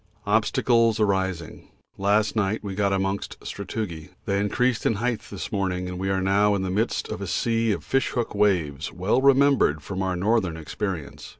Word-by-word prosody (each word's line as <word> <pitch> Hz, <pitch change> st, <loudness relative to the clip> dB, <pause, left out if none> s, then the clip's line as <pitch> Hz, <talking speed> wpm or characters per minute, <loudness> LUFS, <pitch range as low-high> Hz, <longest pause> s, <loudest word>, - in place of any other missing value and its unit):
Obstacles 115 Hz, +2 st, +2 dB
arising 95 Hz, -5 st, -1 dB, 0.3 s
last 100 Hz, +3 st, +1 dB
night 110 Hz, 0 st, 0 dB
we 100 Hz, -2 st, -4 dB
got 100 Hz, 0 st, +1 dB
amongst 95 Hz, +1 st, -2 dB
sastrugi 95 Hz, -5 st, -5 dB, 0.2 s
they 100 Hz, -2 st, 0 dB
increased 115 Hz, +3 st, +1 dB
in 115 Hz, -, +2 dB
height 120 Hz, +2 st, -1 dB
this 100 Hz, -, -6 dB
morning 95 Hz, -3 st, -1 dB
and 90 Hz, 0 st, -5 dB
now -, -, -5 dB
we 95 Hz, -, -1 dB
are 95 Hz, +2 st, +2 dB
in 95 Hz, -, -1 dB
the 95 Hz, -, -2 dB
midst 110 Hz, +5 st, 0 dB
of -, -, -5 dB
a 100 Hz, -, -4 dB
sea 115 Hz, +4 st, +1 dB
of 100 Hz, -, -2 dB
fish 135 Hz, -1 st, +1 dB
hook 120 Hz, -2 st, -2 dB
waves 85 Hz, -8 st, +1 dB
well 95 Hz, +8 st, +1 dB
remembered 135 Hz, -, +4 dB
from 95 Hz, -1 st, -4 dB
our 95 Hz, -1 st, 0 dB
Northern 95 Hz, -3 st, +1 dB
experience. 75 Hz, -3 st, -5 dB
100 Hz, 180 wpm, -25 LUFS, 95-110 Hz, 0.3 s, remembered